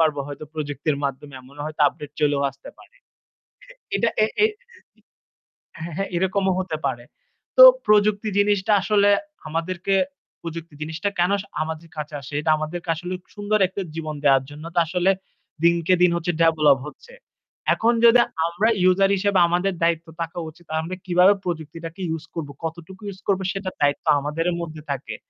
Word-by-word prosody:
পারবো 155 Hz, -3 st, +2 dB
হয়তো। 145 Hz, +1 st, -7 dB
প্রযুক্তির 145 Hz, -1 st, -2 dB
মাধ্যমে 140 Hz, +1 st, -4 dB
এমনও 140 Hz, +3 st, -10 dB
হয়তো 155 Hz, 0 st, -7 dB
আপডেট 145 Hz, +1 st, -10 dB
চলেও 145 Hz, -2 st, +2 dB
আসতে 135 Hz, +1 st, -15 dB
পারে। -, -, -19 dB, 1.0 s
এটা 235 Hz, -, +2 dB
এ -, -, +6 dB, 0.2 s
এ -, -, +8 dB, 1.3 s
হ্যাঁ, 170 Hz, 0 st, -6 dB
হ্যাঁ 195 Hz, 0 st, -1 dB
এরকমও 190 Hz, +1 st, +1 dB
হতে 175 Hz, -4 st, -3 dB
পারে। 120 Hz, -2 st, -2 dB, 0.5 s
তো -, -, +11 dB, 0.2 s
প্রযুক্তি 210 Hz, 0 st, +3 dB
জিনিসটা 205 Hz, 0 st, +2 dB
আসলে 205 Hz, 0 st, +3 dB, 0.4 s
আমাদেরকে 175 Hz, +4 st, -1 dB, 0.5 s
প্রযুক্তি 165 Hz, -1 st, -7 dB
জিনিসটা 160 Hz, +6 st, -2 dB
কেন 180 Hz, +3 st, +3 dB, 0.3 s
আমাদের 160 Hz, +1 st, -5 dB
কাছে 150 Hz, 0 st, -5 dB
আসে, 135 Hz, +2 st, -11 dB
এটা 155 Hz, +1 st, +2 dB
আমাদেরকে 165 Hz, +3 st, -5 dB
আসলে 180 Hz, +3 st, -5 dB, 0.2 s
সুন্দর 205 Hz, +1 st, 0 dB
একটা 195 Hz, +2 st, -5 dB
জীবন 155 Hz, -2 st, -4 dB
দেওয়ার 135 Hz, -2 st, +5 dB
জন্য। 150 Hz, +1 st, -11 dB
তো -, -, +4 dB
আসলে 180 Hz, +3 st, +2 dB, 0.5 s
দিনকে 170 Hz, +1 st, +3 dB
দিন 180 Hz, -1 st, +5 dB
হচ্ছে 170 Hz, +1 st, -1 dB
ডেভেলপ 155 Hz, -4 st, +5 dB
হচ্ছে। 465 Hz, -, -13 dB, 0.6 s
এখন 230 Hz, +2 st, +2 dB
যদি 235 Hz, +1 st, +7 dB, 0.3 s
আমরা 175 Hz, +7 st, +1 dB
ইউজার 185 Hz, +1 st, +4 dB
হিসেবে 200 Hz, 0 st, +2 dB
আমাদের 180 Hz, +3 st, 0 dB
দায়িত্ব 165 Hz, 0 st, +1 dB
থাকা 165 Hz, +1 st, -5 dB
উচিত 170 Hz, +2 st, -19 dB
আমরা 175 Hz, +3 st, -5 dB
কিভাবে 180 Hz, +2 st, +5 dB
প্রযুক্তিটাকে 165 Hz, +1 st, -6 dB
ইউস 160 Hz, 0 st, -4 dB
করব, 160 Hz, -4 st, -4 dB
কতটুকু 170 Hz, +4 st, -7 dB
ইউস 190 Hz, -1 st, -9 dB
করব 195 Hz, -2 st, +2 dB
সেটার 195 Hz, -1 st, -5 dB
দায়িত্ব 145 Hz, 0 st, +1 dB
আমাদের 150 Hz, +4 st, -3 dB, 0.2 s
মধ্যে 160 Hz, -2 st, -7 dB
থাকে 140 Hz, -1 st, -4 dB
170 Hz, 155 wpm, -23 LUFS, 155-190 Hz, 1.3 s, তো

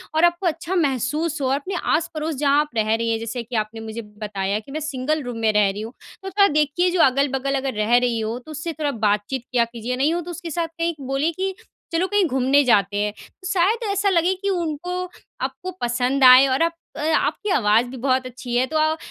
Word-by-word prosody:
और 315 Hz, -, +3 dB
आपको 345 Hz, +1 st, +1 dB
अच्छा 335 Hz, +3 st, -2 dB
महसूस 300 Hz, +1 st, 0 dB
हो। 265 Hz, -, +1 dB
और 270 Hz, -, +2 dB
अपने 330 Hz, +7 st, -4 dB, 0.2 s
आस-पड़ोस 320 Hz, -2 st, -2 dB
जहाँ 285 Hz, +1 st, +3 dB
आप 300 Hz, -, -4 dB
रह 215 Hz, 0 st, +2 dB
रही 230 Hz, 0 st, -1 dB
हैं, 225 Hz, -, 0 dB
जैसे 230 Hz, +2 st, -4 dB
कि 235 Hz, +2 st, -8 dB
आपने 215 Hz, +1 st, -2 dB
मुझे 220 Hz, +1 st, -6 dB
बताया 210 Hz, -1 st, -3 dB
कि, 245 Hz, +6 st, -14 dB
"मैं 310 Hz, -, -3 dB
सिंगल 305 Hz, 0 st, -2 dB
रूम 245 Hz, -2 st, -5 dB
में 220 Hz, -1 st, +2 dB
रह 210 Hz, -1 st, +4 dB
रही 200 Hz, +2 st, -5 dB
हूँ।" 225 Hz, +3 st, -7 dB, 0.3 s
तो 385 Hz, -, -4 dB
थोड़ा 400 Hz, +1 st, +4 dB
देखिए, 305 Hz, +4 st, +2 dB
जो 355 Hz, -1 st, +2 dB
अगल-बगल 275 Hz, 0 st, +2 dB
अगर 270 Hz, -1 st, -2 dB
रह 215 Hz, +3 st, +2 dB
रही 245 Hz, -2 st, +1 dB
हो, 220 Hz, +2 st, -2 dB
तो 280 Hz, +5 st, -13 dB
उससे 310 Hz, +2 st, -4 dB
थोड़ा 300 Hz, -2 st, -2 dB
बातचीत 210 Hz, +2 st, -1 dB
किया 240 Hz, -2 st, +3 dB
कीजिए। 235 Hz, +1 st, -5 dB
नहीं 280 Hz, +5 st, +1 dB
हो 345 Hz, -, -1 dB
तो 350 Hz, -, -7 dB
उसके 345 Hz, 0 st, -7 dB
साथ 335 Hz, +1 st, -1 dB
कहीं 335 Hz, +1 st, -2 dB
बोलिए 275 Hz, +5 st, 0 dB
कि 385 Hz, 0 st, -1 dB, 0.4 s
चलो, 335 Hz, +3 st, +2 dB
कहीं 410 Hz, -1 st, +2 dB
घूमने 265 Hz, 0 st, +3 dB
जाते 205 Hz, -5 st, +2 dB
हैं। 210 Hz, 0 st, 0 dB, 0.3 s
तो 375 Hz, -, -5 dB
शायद 390 Hz, +4 st, +2 dB
ऐसा 400 Hz, 0 st, +1 dB
लगे 350 Hz, 0 st, +2 dB
कि 400 Hz, -, -1 dB
उनको 355 Hz, 0 st, -2 dB, 0.4 s
आपको 370 Hz, 0 st, -4 dB
पसंद 250 Hz, +3 st, 0 dB
आए 255 Hz, +1 st, +9 dB
और 265 Hz, +3 st, 0 dB
आप 335 Hz, 0 st, +1 dB, 0.4 s
आपकी 420 Hz, -, -1 dB
आवाज़ 225 Hz, -4 st, +3 dB
भी 260 Hz, +1 st, -8 dB
बहुत 260 Hz, +1 st, +1 dB
अच्छी 250 Hz, -1 st, -6 dB
है, 250 Hz, -, +3 dB
तो 315 Hz, -, -2 dB
अ, 310 Hz, +1 st, +2 dB
275 Hz, 230 wpm, -22 LUFS, 235-330 Hz, 0.4 s, आए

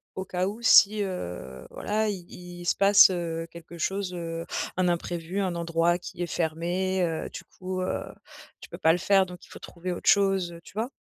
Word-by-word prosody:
au 190 Hz, -, -4 dB
cas 180 Hz, 0 st, -1 dB
où 215 Hz, +4 st, -6 dB
si, 210 Hz, -2 st, +6 dB
heu, 90 Hz, -, -6 dB
voilà, 215 Hz, +1 st, -1 dB
il 185 Hz, -4 st, -6 dB, 0.3 s
il 175 Hz, -, -8 dB
se -, -, +2 dB
passe, 200 Hz, 0 st, +7 dB
heu, 165 Hz, -2 st, -3 dB
quelque 170 Hz, 0 st, -11 dB
chose, 190 Hz, +2 st, -2 dB
heu, 165 Hz, -1 st, -5 dB, 0.3 s
un 185 Hz, -1 st, +2 dB
imprévu, 175 Hz, +1 st, -2 dB
un 185 Hz, -3 st, -1 dB
endroit 170 Hz, 0 st, +1 dB
qui 175 Hz, 0 st, -9 dB
est -, -, -3 dB
fermé, 175 Hz, +4 st, -1 dB
heu, 165 Hz, -2 st, -2 dB
du -, -, -8 dB
coup, 185 Hz, 0 st, -6 dB
heu, 185 Hz, -, -2 dB, 0.6 s
tu -, -, -11 dB
peux -, -, -8 dB
pas 160 Hz, -, +4 dB
le -, -, +1 dB
faire 195 Hz, +1 st, +4 dB
donc 180 Hz, 0 st, -11 dB
il -, -, -22 dB
faut -, -, -11 dB
trouver 180 Hz, +1 st, -6 dB
autre 175 Hz, -, 0 dB
chose, 195 Hz, -3 st, +3 dB
heu, 170 Hz, -, -11 dB
tu -, -, -15 dB
vois? 225 Hz, +5 st, -2 dB
180 Hz, 210 wpm, -27 LUFS, 170-190 Hz, 0.6 s, passe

